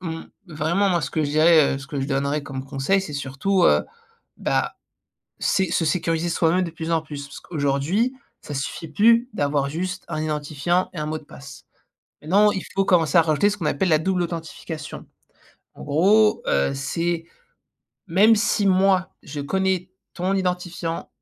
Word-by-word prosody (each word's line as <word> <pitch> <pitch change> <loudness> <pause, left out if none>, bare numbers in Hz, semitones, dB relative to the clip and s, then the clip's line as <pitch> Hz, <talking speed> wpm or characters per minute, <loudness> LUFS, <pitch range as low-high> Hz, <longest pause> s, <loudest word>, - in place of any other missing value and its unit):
mmh, 165 -2 -5 0.2
vraiment 170 +5 0
moi 175 -3 +1
ce 140 - -3
que 155 - 0
je - - -2
dirais, 155 -2 +5
heu, - - -4
ce 135 - -10
que 145 -3 -4
je 135 - -2
donnerais 140 +1 -1
comme 135 -2 -6
conseil 140 +9 0
c'est 160 -6 -7
surtout, 140 +7 0
heu, - - +4 0.5
bah, - - -1 0.7
c'est 190 -2 +1
se 165 - +1
sécuriser 165 +1 0
soi-même 170 +2 +2
de 170 - -3
plus 165 0 -5
en 160 - +2
plus. 145 -2 -7
Parce 140 - -11
qu'aujourd'hui 155 - 0 0.3
ça 145 - -7
suffit 145 +4 -4
plus 230 +3 +4
d'avoir 145 -5 0
juste 185 +5 -4
un 155 -2 -3
identifiant 155 +3 -1
et 170 - -8
un 150 - -2
mot 155 - -2
de 155 - -17
passe. 140 -1 -12 0.6
Maintenant 200 +7 +4
il 190 - -3
faut 195 - +2
commencer 175 -6 +3
à 170 - +8
rajouter 155 +5 +2
ce 205 - -2
qu'on 175 - -6
appelle 180 +6 0
la 155 -2 +4
double 180 +3 0
authentification. 165 -2 -6 0.7
En - - -10
gros, 200 +9 +3
heu, 70 0 +2
c'est, 165 +5 -2 0.8
même 200 +6 +5
si 210 -1 +1
moi 190 -1 +3
je 145 0 -6
connais 190 +4 -1 0.2
ton 185 +2 -1
identifiant 180 -3 -3
165 Hz, 180 wpm, -23 LUFS, 150-185 Hz, 0.8 s, à